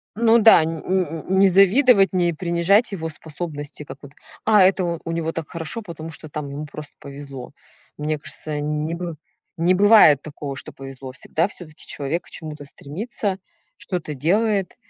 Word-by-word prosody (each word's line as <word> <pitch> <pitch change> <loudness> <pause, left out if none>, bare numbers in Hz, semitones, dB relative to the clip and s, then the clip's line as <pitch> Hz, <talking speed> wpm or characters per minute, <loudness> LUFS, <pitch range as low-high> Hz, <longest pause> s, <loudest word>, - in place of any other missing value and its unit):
Ну 230 +1 +5
да, 220 -7 +7
нь 160 0 -3
нь 185 0 +2
нь 160 +1 -7 0.2
не 195 - +7
завидовать, 195 +3 +5
не 175 -2 +2
принижать 175 +7 +2
его 165 -4 -4
способности, 150 -1 -7
как 140 - -10
вот: 140 - -11 0.3
"А 210 -2 +5
это 185 -3 +2
у 165 - -4
него 165 -1 -2
так 165 -2 -6
хорошо, 170 +7 -5
потому 165 -4 -8
что 155 0 -11
там 150 -1 -5
ему 145 +2 -6
просто 150 0 -10
повезло". 140 -2 -9 0.5
Мне 150 0 -2
кажется, 150 0 -5
не 150 +2 -2
бы 170 -1 -5 0.4
не 175 +3 +3
бывает 200 -8 +7
такого, 145 -2 -7
что - - -8
повезло, 135 -1 -9
всегда 165 +6 -1
всё-таки 165 -6 -12
человек 150 +5 -3
к - - -16
чему-то 150 -3 -7
стремится, 190 - -4 0.4
что-то 175 -5 -4
делает 195 - +1
165 Hz, 170 wpm, -22 LUFS, 150-190 Hz, 0.5 s, да